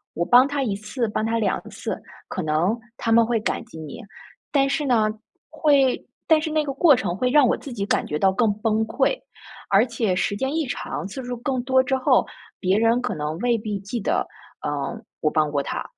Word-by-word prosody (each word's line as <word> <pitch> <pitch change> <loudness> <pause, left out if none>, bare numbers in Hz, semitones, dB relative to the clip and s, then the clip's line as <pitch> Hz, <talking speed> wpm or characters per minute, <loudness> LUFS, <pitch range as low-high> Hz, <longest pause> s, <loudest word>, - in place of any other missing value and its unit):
我 170 - 0
帮 245 +5 +7
他 285 0 -2
1 210 -6 -1
次， 215 +4 -3
帮 215 +1 -2
他 230 +1 0
2 220 - 0
次， - - -5 0.3
可 185 - -4
能 160 +8 +1 0.2
他 230 - -3
们 230 0 +6
会 230 0 0
感 220 - -2
激 160 - -11
你。 155 - -8 0.5
但 275 -2 +3
是 290 +1 0
呢， 220 -5 +3 0.4
会 280 -4 +2 0.2
但 315 -1 +5
是 315 - -2
那 310 0 +2
个 280 - -3
过 295 0 +6
程 190 -8 -2
会 250 +4 +1
让 275 -1 +5
我 - - +2
自 275 - -9
己 200 -3 -2
感 - - 0
觉 150 - -2
到 190 +4 +3
更 215 +3 +2
崩 220 0 +1
溃， 360 - +1 0.5
而 200 +4 +5
且 230 -5 -1
时 200 +2 0
间 265 +6 -2
一 320 -2 0
长， 245 - -4
次 260 +6 -7
数 245 0 -4
更 255 +1 -2
多 260 0 +4
之 265 0 0
后， 255 - +3 0.3
别 190 +1 +2
人 230 +2 +3
可 250 -4 -2
能 150 +1 -3
未 240 +1 +2
必 210 -2 -4
记 205 +5 -5
得， - - 0 0.4
呃， - - -2 0.5
我 155 - +2
帮 155 -1 +1
过 145 -1 0
他。 - - -4
230 Hz, 230 characters per minute, -23 LUFS, 200-260 Hz, 0.5 s, 帮